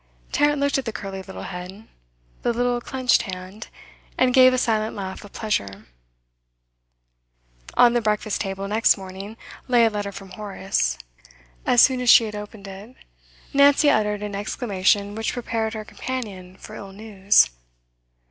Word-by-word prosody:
Tarrant 290 0 +2
looked 280 -1 +1
at 265 - -6
the 225 - -2
curly 195 -2 -6
little 190 0 -9
head, 185 +4 -8 0.5
the - - +1
little 245 +1 0
clenched 255 0 +1
hand, 190 +1 -8 0.5
and 255 -1 +3
gave 255 0 +7
a 255 - 0
silent 220 -3 0
laugh 190 -1 -6
of 205 - -13
pleasure. 100 - -3 1.9
On 240 -1 +6
the 240 - +1
breakfast 215 -1 -1
table 195 0 -4
next 215 +2 +3
morning 195 +3 -9 0.3
lay 240 -2 +4
a 225 - +2
letter 205 -1 -4
from 195 -1 -11
Horace. 195 - -2 0.7
As 245 - +6
soon 260 -2 +3
as 250 - +1
she 235 - +8
had 215 -1 -5
opened 210 -1 -9
it, 200 +6 -11 0.6
Nancy 285 +1 +5
uttered 210 -3 0
an 205 -1 -5
exclamation 200 -1 0
which 225 +1 -3
prepared 225 -2 -3
her 215 -1 -6
companion 200 -8 -6
for 215 - -12
ill 195 -2 -9
news. 200 - +3
215 Hz, 155 wpm, -23 LUFS, 195-240 Hz, 1.9 s, she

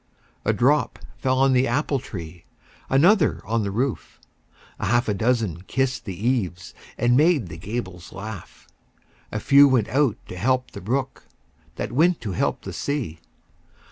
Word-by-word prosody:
A - - +3
drop 145 +5 +2 0.2
fell 130 -1 +1
on 135 0 +4
the 130 +1 +3
apple 145 -1 0
tree, 85 -8 -9 0.4
Another 165 +6 +4
on 115 0 0
the 100 - -2
roof; 120 +4 -3 0.6
A - - -2
half 120 +4 +2
a 105 - +1
dozen 110 -5 0
kissed 135 +2 -1
the 100 +2 -4
eaves, 90 -9 -1 0.2
And 120 0 +3
made 150 - +3
the 80 - -8
gables 95 -2 -6
laugh. 100 -2 -9 0.6
A 110 - -2
few 140 +6 +6
went 125 -6 +2
out 135 -5 +2
to - - -8
help 130 +6 0
the - - -9
brook, 130 +7 -3 0.5
That - - -4
went 165 +7 +3
to 110 -4 -4
help 90 - -1
the - - -6
sea. 130 - -3
120 Hz, 160 wpm, -23 LUFS, 100-135 Hz, 0.6 s, few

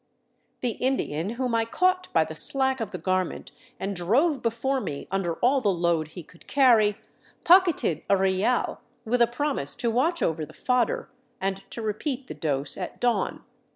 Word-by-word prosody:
The 245 - 0
Indian 195 - -1
whom 250 -1 -2
I 230 0 +2
caught 365 +10 0
by 160 - +3
the 160 - -8
slack 265 - +6
of 225 -3 -3
the - - -6
garment 185 -2 -2 0.3
and 195 +1 -3
drove 260 - +1
before 250 +4 -1
me 140 -9 -6
under 185 -4 -1
all 265 +2 +3
the 210 - +1
load 170 -4 0
he 170 +3 -10
could 170 +2 -20
carry, 230 -7 +4 0.5
pocketed 345 - +4
a 200 - +4
real 190 +6 0 0.2
with 240 +2 0
a 235 - +6
promise 245 - -1
to 235 - -1
watch 315 +9 0
over 160 -1 -1
the 155 - -10
fodder, 250 -3 -1 0.3
and 195 0 -2
to 230 - -6
repeat 250 +5 -3
the - - -8
dose 145 -2 -2
at 180 - -6
dawn. 240 -1 -1
225 Hz, 175 wpm, -25 LUFS, 180-260 Hz, 0.5 s, slack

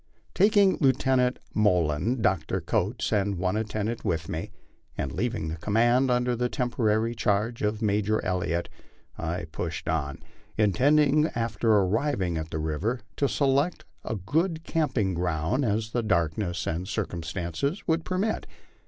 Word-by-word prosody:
Taking 200 0 +4
Lieutenant 130 -2 +3 0.2
Moylan, 100 - +1
Dr. 95 0 +1
Coates, 100 +8 -1
and 100 -2 +1
one 90 +2 0
attendant 110 +1 -2
with 80 -2 -1
me, 80 - -4 0.5
and 70 - -2
leaving 115 -8 -2
the 80 - -4
command 120 +8 +2
under 125 0 +2
temporary 115 -2 0
charge 110 +1 0
of 105 +1 -1
Major 105 +1 +1
Elliott, 90 -2 -1 0.5
I 85 +1 -3
pushed 85 0 -4
on, 70 -3 -1 0.4
intending 145 - +4
after 115 -1 0
arriving 100 - +1
at 80 0 -5
the 80 - -4
river 80 +11 -2 0.2
to 140 - +2
select 140 +4 +1 0.2
as 110 - -3
good 160 - 0
camping 130 - 0
ground 90 - 0
as 110 -1 0
the 120 - 0
darkness 85 -2 0
and 85 +3 -2
circumstances 90 - -3
would 165 -1 +1
permit. 190 +6 -1
105 Hz, 135 wpm, -27 LUFS, 90-125 Hz, 0.5 s, Taking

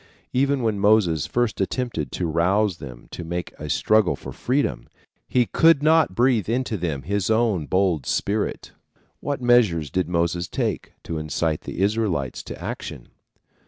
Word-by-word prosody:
Even 135 0 +1
when 110 -3 0
Moses 100 -7 +3
first 120 -4 0
attempted 95 - -2
to 90 - -2
rouse 90 +4 +1
them 60 -5 -10
to - - -6
make 85 +1 -4
a 75 - -6
struggle 110 +5 +3
for - - -9
freedom, 125 - -1 0.4
he 125 -1 +2
could 160 0 +4
not 155 - +4
breathe 120 -4 +2
into 120 -1 -1
them 80 -8 -3
his 100 +4 -1
own 110 -8 +1
bold 90 -7 +1
spirit. 105 +1 -1 0.5
What 140 -3 -3
measures 105 - +3
did 90 -2 -1
Moses 85 0 0
take - - -3
to 80 -1 -4
incite 75 0 -1
the - - -5
Israelites 100 - 0
to - - -8
action? - - -6
100 Hz, 155 wpm, -23 LUFS, 85-120 Hz, 0.5 s, could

